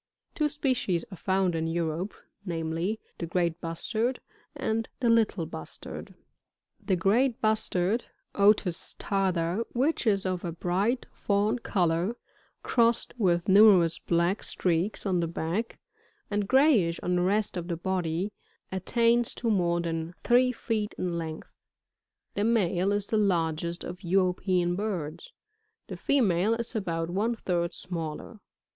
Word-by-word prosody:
Two 300 -1 +1
species 255 - -1
are - - -6
found 190 0 +1
in 165 0 -1
Europe, 165 +3 -2 0.3
namely; 170 +3 -2 0.2
the 170 - -3
great 170 -1 0
Bustard, 220 +9 -2 0.4
and 225 +1 -1
the 240 -3 +3
Little 215 -6 +2
Bustard. 160 0 -7
22. - - -20 0.7
The 190 - +3
Great 225 +8 +2
Bustard, 215 -1 +1 0.2
— - - -51 0.2
Otis 185 -5 0
tarda, 190 0 0
— - - -31
which 280 -2 +1
is 200 -3 +2
of 185 -1 -2
a 170 - -3
bright 190 +9 0
fewn 205 +3 0
colour, 180 0 0 0.5
crossed 235 -1 +2
with 175 -2 +2
numerous 190 -5 +6
black 170 +4 +1
Streaks 180 +5 0
on 185 -3 +1
the 170 - 0
back, 170 +7 -3 0.5
and 205 -1 0
grayish 250 - +4
on 180 0 +1
the - - +2
rest 200 +3 +2
of 175 -1 -4
the 170 -2 -2
body, 180 +1 -1 0.4
attains 230 +5 +2
to 230 -2 -1
more 175 -4 +2
than 165 0 -3
three 250 +1 +4
feet 220 -3 -3
in 180 -2 -2
length; 160 -1 -7 0.8
the 205 - -1
male 200 -4 +2
is 205 -1 0
the 220 - 0
largest 170 -4 0
of 180 +1 -7
European 180 -1 +1
birds; 195 - -4 0.6
the - - -5
female 220 -6 +2
is 235 +1 -5
about 165 -5 -2
one 215 +6 0
third 175 -5 -1
smaller. 170 +4 -6
190 Hz, 140 wpm, -28 LUFS, 170-220 Hz, 0.8 s, numerous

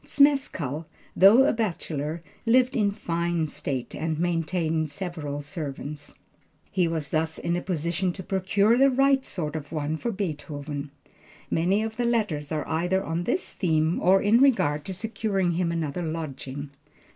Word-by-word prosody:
Zmeskall, 225 - +2 0.3
though 210 +8 +8
a - - +3
bachelor, 165 -7 -3 0.2
lived 255 +2 +4
in 210 -4 +3
fine 170 -4 -1
state, 145 -4 -4
and 160 0 -2
maintained 165 -2 0
several 150 -3 -4
servants. 145 -1 -6 0.6
He 180 -2 +2
was 160 -4 -3
thus 160 +1 0
in 170 0 -1
a 175 - -1
position 175 +1 -1
to 190 - -7
procure 200 +5 +2
the 275 +1 +6
right 270 +1 +3
sort 155 - -4
of 145 -2 -6
one 155 0 -2
for 235 - -3
Beethoven. 150 -6 -4 0.6
Many 185 +6 +2
of 220 0 -5
the 245 - 0
letters 205 -12 0
are 155 -1 -2
either 180 +4 0
on 170 0 -2
this 365 - -1
theme 160 -2 +1
or 190 +2 +4
in 220 +4 +5
regard 150 - +3
to 190 - -4
securing 200 -3 -1
him 170 0 0
another 165 0 -2
lodging. 145 -4 -5
170 Hz, 155 wpm, -26 LUFS, 155-200 Hz, 0.6 s, though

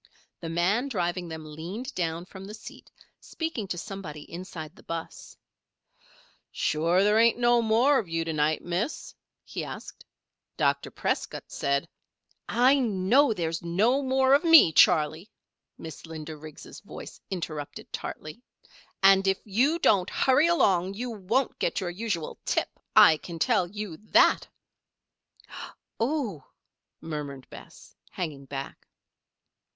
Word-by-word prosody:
The 165 - -6
man 185 +10 +1
driving 180 -6 -2
them 160 -1 -7
leaned 175 - -7
down 165 -1 -2
from 190 +1 -11
the 210 +2 -8
seat, 220 - -12 0.3
speaking 320 - -5
to 180 - -4
somebody 170 -5 -7
inside 170 -2 -8
the - - -16
'bus. 165 -1 -7 1.1
"Sure 170 +5 +1
there 210 +2 +4
ain't 230 0 +4
no 240 0 +4
more 235 +6 +3
of 195 - -6
you 165 0 -1
to 165 - -2
night, 155 +1 0
Miss?" 180 - -3 0.3
he - - -5
asked. - - -9 0.5
"Dr. - - +1
Prescott - - -3
said 140 +3 -1 0.4
" - - -25 0.2
"I 280 +1 +4
know 230 +4 +3
there's 165 -5 -2
no 210 +11 +2
more 265 0 +3
of 285 +4 +4
me, 325 - +8
Charley," 160 +3 +4 0.5
Miss 160 0 -9
Linda 160 -1 -7
Riggs' 155 0 -11
voice - - -11
interrupted 155 -6 -6
tartly. 155 +10 -7 0.6
"And 195 0 +6
if 190 0 +3
you 250 - +2
don't 200 - +3
hurry 275 +5 +3
along 195 - +2
you 245 +3 -4
won't 225 +5 -1
get 170 - 0
your 180 -3 -3
usual 185 -4 -4
tip, - - -2 0.2
I 160 - +8
can 170 +2 -8
tell 210 -2 +2
you 205 -4 -6
that!" 215 - +3 1.5
"Oh!" 230 - -1 0.6
murmured 145 -4 -6
Bess, - - -13
hanging 150 -6 -5
back. 135 0 -7
185 Hz, 135 wpm, -27 LUFS, 160-230 Hz, 1.5 s, me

